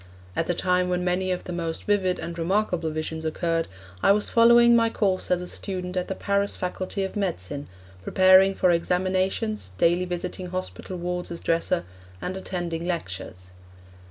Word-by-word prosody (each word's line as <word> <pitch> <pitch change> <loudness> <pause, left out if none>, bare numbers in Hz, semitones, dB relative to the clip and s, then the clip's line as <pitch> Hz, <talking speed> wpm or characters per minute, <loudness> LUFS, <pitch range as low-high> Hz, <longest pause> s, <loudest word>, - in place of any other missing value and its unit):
At 165 - 0
the 175 - 0
time 180 +1 +1
when 180 0 0
many 180 +1 0
of 180 -1 -2
the 180 - -6
most 165 -1 -3
vivid 190 -3 +1
and 170 - -6
remarkable 175 -1 0
visions 155 +1 -4
occurred 165 +1 -1 0.3
I - - +5
was 210 0 0
following 235 0 +7
my 230 -1 +4
course 195 -4 +1
as 180 -1 +2
a 180 - -6
student 180 -2 -5
at 180 -1 -1
the 190 - -3
Paris 200 +1 0
Faculty 185 +2 -3
of 190 - -4
Medicine, 145 - -3 0.4
preparing 190 - +5
for 180 - +3
examinations, 185 - 0
daily 175 - +3
visiting 180 +1 -4
hospital 185 0 -5
wards 180 0 -3
as 170 -1 -5
dresser, 165 - 0 0.4
and 180 - -4
attending 175 -3 -4
lectures. 95 - -5
180 Hz, 165 wpm, -25 LUFS, 170-190 Hz, 0.4 s, following